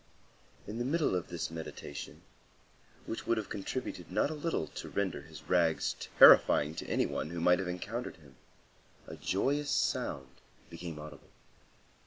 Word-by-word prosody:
In 110 +3 -5
the - - 0
middle 150 - +1
of 90 - -2
this 85 -2 -4
meditation, 80 -3 -7 0.8
which 115 - -5
would 115 - +2
have 110 - -3
contributed 125 +6 -5
not 145 - +1
a - - -2
little 155 - -1
to - - -8
render 95 -7 -1
his 80 +2 -12
rags 85 -3 +2 0.2
terrifying 75 +2 +8
to - - -6
any - - +1
one 75 - -3
who 85 0 -4
might 90 +2 +4
have 95 - -2
encountered 100 +7 -4
him, 70 -6 -19 0.7
a - - -8
joyous 145 +10 0
sound 65 -1 -1 0.3
became 85 -1 -7
audible. 75 -2 -10
90 Hz, 155 wpm, -32 LUFS, 80-115 Hz, 0.8 s, terrifying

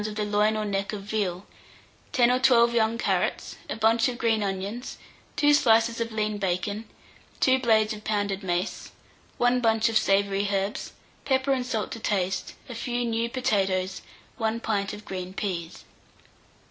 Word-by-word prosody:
of 210 - -6
the 210 -1 -1
loin 210 +1 +2
or 215 - -1
neck 200 0 -2
of 200 -2 -5
veal, 200 -3 -2 0.7
10 245 -2 +4
or 250 - +2
12 240 -2 +5
young 225 0 +2
carrots, - - -1
a - - -2
bunch 225 +1 +3
of 245 - -5
green 225 -2 +1
onions, 200 +5 -4 0.4
2 295 0 +4
slices 230 -4 +3
of 230 0 -2
lean 215 -1 -1
bacon, 200 +3 -2 0.5
2 260 0 +4
blades 220 -3 +3
of 210 0 -9
pounded 205 -2 -1
mace, 180 0 -2 0.5
1 245 +1 +2
bunch 225 -1 +3
of 225 - +2
savoury 200 0 +1
herbs, 195 +1 -2 0.3
pepper 265 0 +1
and 250 -2 -2
salt 220 -4 -2
to 230 - -5
taste, 195 -3 -1
a 250 - -7
few 240 +1 -2
new 230 0 -1
potatoes, 195 -7 0 0.4
1 225 0 -1
pint 200 -4 -1
of 210 0 -9
green 185 0 -6
peas. 175 -6 -4
215 Hz, 165 wpm, -26 LUFS, 200-235 Hz, 0.7 s, 12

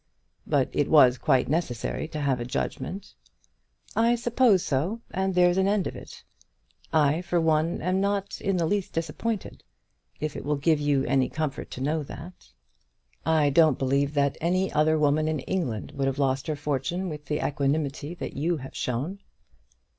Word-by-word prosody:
"But - - +2
it - - +1
was 125 0 +6
quite 130 - +2
necessary 150 -3 -2
to 155 -1 -5
have 135 -3 +1
a - - -2
judgment." 190 +10 -4 0.8
"I 230 +2 +4
suppose 235 -4 +3
so, 160 - -1
and 190 0 -1
there's 180 +1 +4
an 190 - +3
end 200 -2 +1
of - - -4
it. - - -11 0.7
I, 155 +1 +3
for 175 -1 0
one, 160 0 +1
am 185 +2 +1
not 200 0 -1
in 195 -1 0
the 170 - +1
least 200 +3 -1
disappointed, 170 +7 -3 0.6
if 155 -1 -3
it - - -5
will 150 +1 0
give 150 +2 +2
you 145 -2 +1
any 130 0 +2
comfort 155 -3 -3
to 130 - -7
know 155 +3 0
that." 170 +5 -10 0.8
"I 155 -3 +3
don't 155 -2 +5
believe 140 +2 0
that 140 -1 +1
any 185 +3 +1
other 155 +1 +3
woman 155 +1 +2
in 155 -3 -1
England 130 - -3
would 135 -1 -1
have 135 0 -1
lost 135 +1 0
her 155 - -1
fortune 145 +6 -2
with 150 -3 -6
the 150 - -1
equanimity 145 +2 -1
that - - -6
you 165 +4 0
have 135 -1 -9
shown." 140 +11 -3
155 Hz, 175 wpm, -26 LUFS, 140-180 Hz, 0.8 s, was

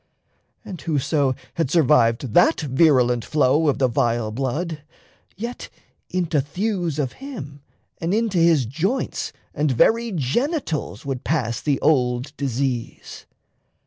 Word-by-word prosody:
And 185 -4 -8
whoso 145 -3 0 0.2
had 165 -6 -1
survived 130 -7 +3
that - - +4
virulent 130 -5 +3
flow 150 +1 +2
Of 145 - +2
the 135 -2 +3
vile 115 -2 0
blood, 145 +7 -3 0.6
yet 235 +4 -6 0.4
into 165 -5 0
thews 175 +1 -2
of 135 -5 -1
him 145 - -8 0.4
And 165 +1 -2
into 215 -3 +1
his 165 -6 +4
joints 175 - -2 0.2
and 150 0 0
very 230 - +3
genitals 160 - -2
Would 135 -2 -4
pass 125 -7 -1
the 145 -3 0
old 130 -1 +1
disease. 130 -3 -3
145 Hz, 120 wpm, -22 LUFS, 130-170 Hz, 0.6 s, that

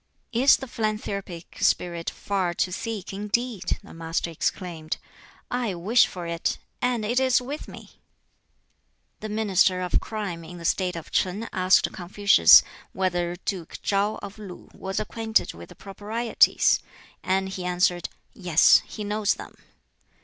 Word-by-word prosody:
"Is 255 +4 +5
the 265 - -7
philanthropic 205 -6 -4
spirit 170 -1 +1
far 185 -4 -2
to 180 - 0
seek, 205 0 -5
indeed?" 210 +2 -2
the - - -13
Master 165 +1 -3
exclaimed; 165 -1 -3 0.5
"I 245 -6 -1
wish 210 +8 +4
for 180 -2 -7
it, 170 0 -2 0.2
and 245 -3 0
it 240 +4 +1
is 260 -1 +3
with 275 +4 -6
me!" - - -13 1.2
The 215 - -6
Minister 195 -4 +2
of 180 -1 +1
Crime 200 -6 -5
in 175 +2 -10
the 170 - -9
State 180 +1 0
of 165 - -8
Ch'in 200 +5 0
asked 185 0 +3
Confucius 185 - +6 0.3
whether 175 -2 -1
Duke 180 -5 -4
Ch'an, 205 +1 +1
of 200 +1 -8
Lu 195 -4 -10
was 190 0 -4
acquainted 220 +1 0
with 85 +1 -12
the - - -13
Proprieties; 215 +4 +2 0.4
and 190 +1 0
he 190 -1 -5
answered, 180 0 +1 0.2
"Yes, 175 -4 +5
he 210 - -7
knows 210 0 0
them." - - -10
195 Hz, 140 wpm, -25 LUFS, 175-215 Hz, 1.2 s, Confucius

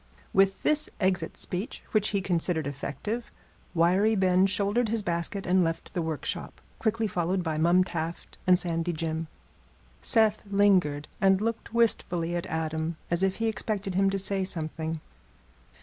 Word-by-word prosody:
With 195 0 +3
this 305 0 +4
exit 185 -4 0
speech, 185 +6 -4
which 215 -1 +3
he 200 -2 0
considered 175 -3 0
effective, 145 - -4 0.4
Wiry 185 +6 +3
Ben 185 -1 +4
shouldered 205 +3 +1
his 225 -1 +1
basket 170 +2 -2
and 185 +1 +3
left 165 0 -3
the 175 - -1
workshop, 160 -2 -4 0.2
quickly 225 0 0
followed 180 -1 -1
by 160 -2 -2
Mum 175 +3 +4
Taft 165 -2 -5
and 180 0 +7
Sandy 170 -1 -1
Jim. 160 0 -3 0.7
Seth 220 -2 +3
lingered, 185 -8 +3
and 195 -1 +5
looked 230 +1 -3
wistfully 175 -7 +1
at 175 - -3
Adam, 160 0 -2
as 170 +1 +2
if 190 0 +2
he 225 - -2
expected 215 -3 -2
him 195 +1 +3
to 195 - -1
say 195 0 +1
something. 160 -2 -2
185 Hz, 150 wpm, -28 LUFS, 165-200 Hz, 0.7 s, and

